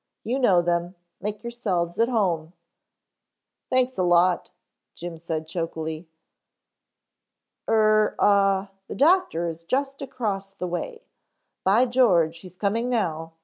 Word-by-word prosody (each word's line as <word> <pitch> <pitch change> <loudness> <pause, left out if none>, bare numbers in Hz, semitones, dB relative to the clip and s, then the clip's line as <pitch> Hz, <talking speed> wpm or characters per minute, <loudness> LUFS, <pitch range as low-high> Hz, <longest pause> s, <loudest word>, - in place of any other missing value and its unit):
"You 250 +5 -1
know 185 -9 +4
them. 175 +1 -1 0.3
Make 210 +2 -4
yourselves 195 -8 -2
at 230 +1 +3
home 175 -8 0 0.6
" - - -60
"Thanks 255 -3 +1
a - - +3
lot," 175 0 +3 0.5
Jim 170 -1 -7
said 160 -1 -4
chokily. 160 -1 -4 1.6
"Er, 215 -1 +3
ah, 195 -1 +3 0.2
the - - -6
doctor 305 - +3
is 165 0 -6
just 275 +8 -2
across 205 -7 -4
the 190 - -5
way. 455 - -5 0.6
By 210 +7 +4
George, 180 -11 +3
he's 185 0 -13
coming 220 +5 -1
now. 165 -9 -2
195 Hz, 125 wpm, -25 LUFS, 170-235 Hz, 1.6 s, know